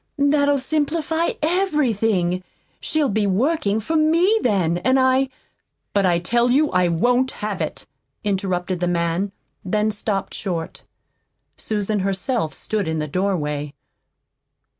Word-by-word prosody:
that'll 285 0 +3
simplify 315 +3 0
everything. 225 - +1 0.4
She'll 310 -3 0
be 210 -2 0
working 215 - +1
for 320 +10 -3
ME, 335 +8 +3
then, 180 -7 +1
and 260 +8 +2
I 260 +1 +3 0.3
" - - -54
"But 200 -2 +3
I 175 -1 +3
tell 235 +8 +1
you 290 +5 +3
I 180 -1 +3
won't 245 +10 +2
have 210 -1 -4 0.4
" - - -52
interrupted 185 -3 -1
the 175 - 0
man, 170 +3 0 0.3
then 210 +3 0
stopped 205 -1 -2
short. 170 -5 -4 0.7
Susan 210 -1 -2
herself 195 - -1
stood 210 -4 -2
in 160 0 -1
the 155 0 -2
doorway. 150 -5 -2
210 Hz, 130 wpm, -22 LUFS, 180-275 Hz, 0.7 s, that'll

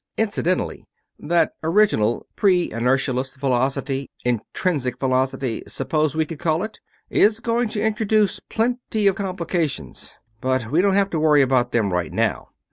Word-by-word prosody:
Incidentally, 200 -4 -1 0.3
that 170 0 +2
original, 160 - +2
pre 185 -4 +2
inertialess 130 +2 0
velocity 135 +1 -1 0.2
'intrinsic' 125 - -1
velocity, 130 -2 0
suppose 155 -1 -1
we 160 0 +1
could 155 -1 -8
call 160 +2 0
it? 215 0 -7 0.3
is 215 +1 +4
going 235 0 0
to 210 0 -2
introduce 215 -2 +1
plenty 230 -2 -1
of 195 -2 +4
complications, 170 - -3 0.3
but 130 -3 -1
we 160 +4 +4
don't 195 0 +2
have 200 0 +2
to 160 - -1
worry 150 -2 +5
about 130 -2 +1
them 105 -5 +1
right 90 -2 -2
now. - - -1
155 Hz, 140 wpm, -22 LUFS, 130-200 Hz, 0.3 s, worry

